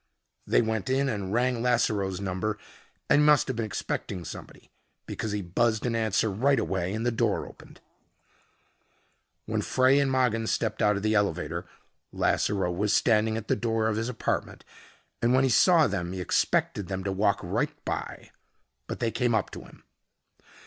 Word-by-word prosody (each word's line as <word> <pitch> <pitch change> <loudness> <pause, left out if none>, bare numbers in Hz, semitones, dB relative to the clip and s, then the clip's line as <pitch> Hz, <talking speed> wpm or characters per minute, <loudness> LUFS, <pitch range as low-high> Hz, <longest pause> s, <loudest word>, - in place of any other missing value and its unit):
They - - +3
went 110 +2 -2
in 135 +1 +1
and 100 -6 -3
rang 120 +1 +1
Lasseroe's 105 -6 +1
number 100 +2 -2 0.5
and 145 - +4
he - - +4
must 150 -1 +5
have 130 - -2
been 115 -1 -2
expecting 95 -3 -4
somebody - - -10 0.3
because 110 - -4
he 105 -1 -2
buzzed 110 +6 0
an 120 -2 0
answer 110 -1 +1
right 135 +8 +2
away 95 -1 -2
and 110 +2 -3
the 120 - +2
door 115 - 0
opened. - - -15 1.7
When - - -1
Frey 130 +2 +3
and 140 -1 +2
Mogin 125 -4 +1
stepped 110 - -1
out 105 -1 +3
of 100 - -5
the 110 0 +2
elevator, 85 -5 -1 0.4
Lasseroe 95 -4 0
was 100 +3 0
standing 110 -1 +2
at 110 - -6
the - - +2
door 115 -2 0
of 110 - -1
his 115 +2 -2
apartment 125 - -3 0.6
and 120 +2 +3
when 130 - +4
he 135 - +2
saw 165 - +5
them 90 -6 -2
he 95 - -5
expected 90 +2 0
them 95 -1 -4
to 100 - -2
walk 100 +1 +1
right - - -1
by. - - -5 0.6
But - - -6
they 115 - +1
came 120 0 +1
up 105 - -1
to - - -7
him. - - -16
110 Hz, 175 wpm, -27 LUFS, 100-120 Hz, 1.7 s, must